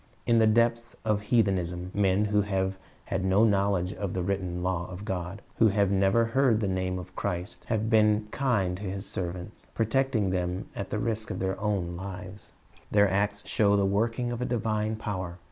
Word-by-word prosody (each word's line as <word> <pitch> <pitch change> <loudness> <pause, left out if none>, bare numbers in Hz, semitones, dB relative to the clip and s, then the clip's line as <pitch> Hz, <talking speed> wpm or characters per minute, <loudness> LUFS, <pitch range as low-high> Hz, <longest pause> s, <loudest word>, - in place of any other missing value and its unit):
In 115 -1 +4
the 110 - +5
depths 115 +2 +2
of 105 -2 +1
heathenism, 95 -5 0
men 100 0 +2
who 105 0 +2
have 95 -1 -1 0.3
had 95 0 -2
no 95 +3 +4
knowledge 100 -4 +2
of 100 -2 -4
the 90 - -1
written 90 -2 -2
law 90 -1 -1
of 90 +3 -8
God, 90 +1 -4
who 110 - +6
have 100 -2 +2
never 100 +4 +3
even 115 - -3
heard 130 -5 +4
the 105 - 0
name 95 -1 -1
of 90 0 -9
Christ, 90 -1 -4
have 110 -1 -1
been 105 -1 +3
kind 105 -10 0
to - - -11
His 95 -1 -4
serv 90 -3 -3
ants, 90 +4 -10
protecting 115 -3 +1
them 90 +2 -2
at 100 - -4
the - - -2
risk 110 -1 -2
of 90 - -3
their 95 0 -2
own 95 -5 -1
lives 95 +1 -8 0.4
Their 100 -1 +4
acts 100 +1 0
show 100 -3 +3
the 100 - +3
working 115 +5 0
of 120 0 -4
a - - +1
divine 110 -2 -1
power. 95 -5 -4
100 Hz, 195 wpm, -28 LUFS, 95-110 Hz, 0.4 s, who